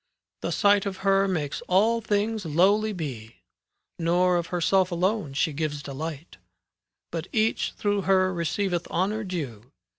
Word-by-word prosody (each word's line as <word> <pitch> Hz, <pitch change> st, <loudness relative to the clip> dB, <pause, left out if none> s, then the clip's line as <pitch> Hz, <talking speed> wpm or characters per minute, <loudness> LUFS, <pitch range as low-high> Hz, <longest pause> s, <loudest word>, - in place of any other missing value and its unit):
The -, -, -2 dB
sight 205 Hz, -1 st, +3 dB
of 190 Hz, -1 st, -4 dB
her 195 Hz, 0 st, +4 dB
makes 155 Hz, -7 st, -2 dB
all 220 Hz, +5 st, +3 dB
things 215 Hz, 0 st, 0 dB
lowly 195 Hz, +7 st, +3 dB
be; 130 Hz, -, -6 dB, 0.6 s
Nor 175 Hz, +2 st, +3 dB
of 170 Hz, -1 st, -2 dB
herself 185 Hz, +1 st, +2 dB
alone 180 Hz, -3 st, 0 dB
she 150 Hz, +2 st, 0 dB
gives 150 Hz, -1 st, -3 dB
delight, 155 Hz, +3 st, -6 dB, 0.4 s
'" -, -, -62 dB
But -, -, -4 dB
each 220 Hz, -3 st, +1 dB
through 205 Hz, -1 st, 0 dB
her 185 Hz, -1 st, +4 dB
receiveth 175 Hz, +1 st, -1 dB
honour 205 Hz, +5 st, -1 dB
due. 135 Hz, -, -6 dB
180 Hz, 145 wpm, -26 LUFS, 160-200 Hz, 0.6 s, her